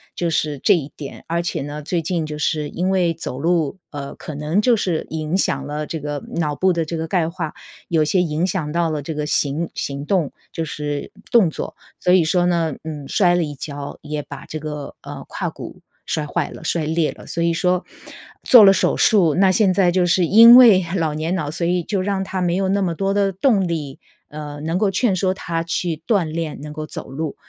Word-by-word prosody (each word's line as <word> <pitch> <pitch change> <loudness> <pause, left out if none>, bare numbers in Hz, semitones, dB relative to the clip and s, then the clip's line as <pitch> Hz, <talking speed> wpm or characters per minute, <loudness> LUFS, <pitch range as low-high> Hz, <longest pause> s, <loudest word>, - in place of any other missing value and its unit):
就 170 -1 -1
是 150 -2 -1
这 - - +4
一 150 -3 -3
点。 140 -3 -9
而 170 +1 0
且 175 - -3
呢， 145 +1 -6
最 170 +1 -1
近 165 -1 -2
就 150 0 -6
是 150 -1 -1
因 180 +2 -2
为 180 -3 +2
走 155 -5 -6
路， 165 +1 0
呃， 140 -2 -6
可 155 - -8
能 155 +7 0
就 235 -1 +3
是 175 -5 -1
影 155 +2 -2
响 140 -7 0
了 150 +1 -3
这 160 - -5
个 145 -1 -5
脑 150 -3 0
部 185 +3 +2
的 165 -2 -1
这 165 - -4
个 160 0 -3
钙 175 -4 +1
化， 165 -3 -5 0.4
有 160 -3 +2
些 180 +4 +2
影 165 +2 0
响 165 -5 -2
到 170 0 +1
了 150 -2 -2
这 160 +3 -5
个 150 0 -3
行 150 +2 0
行 140 +1 -4
动， 175 -7 0 0.2
就 165 - -2
是 145 -1 -4 0.2
动 215 -8 +5
作。 - - -6 0.2
所 180 - +2
以 180 -3 +5
说 175 +2 +2
呢， 165 -4 +1
嗯， 150 -3 -6
摔 175 -3 +3
了 175 - +1
一 150 -1 -5
跤， 145 0 -7
也 150 0 -4
把 145 -2 -10
这 155 - -6
个， 150 -2 -6
呃， - - -9
胯 - - -3
骨 - - -10 0.2
摔 155 -1 -2
坏 - - -2
了、 - - -11
摔 160 -1 -1
裂 160 0 0
了。 - - -14
所 170 - -2
以 170 - +2
说 180 +1 +1 0.6
做 240 -4 +8
了 195 - +9
手 - - +2
术， 180 -8 +4
那 190 0 +4
现 190 -1 +3
在 180 -3 +3
就 180 0 +2
是 175 0 +3
因 230 +6 +9
为 215 -8 +8
老 160 -4 0
年 160 +4 -2
脑， 150 -4 -2
所 170 +1 -2
以 175 -1 +1
就 195 +1 -1
让 195 0 -1
他 190 -1 -4
没 175 0 +1
有 190 0 0
那 200 +1 +1
么 170 -3 -1
多 195 +2 0
的 200 -1 +1
动 195 -3 +2
力， 150 -5 -4 0.3
呃， 150 -1 -7
能 165 +3 -1
够 205 -1 +2
劝 195 +2 +1
说 185 0 +1
他 165 -3 -3
去 165 -1 -2
锻 200 -6 +3
炼， 155 -2 -4
能 150 0 -7
够 155 0 -6
走 - - -8
路。 150 +2 -4
165 Hz, 245 characters per minute, -20 LUFS, 150-185 Hz, 0.6 s, 了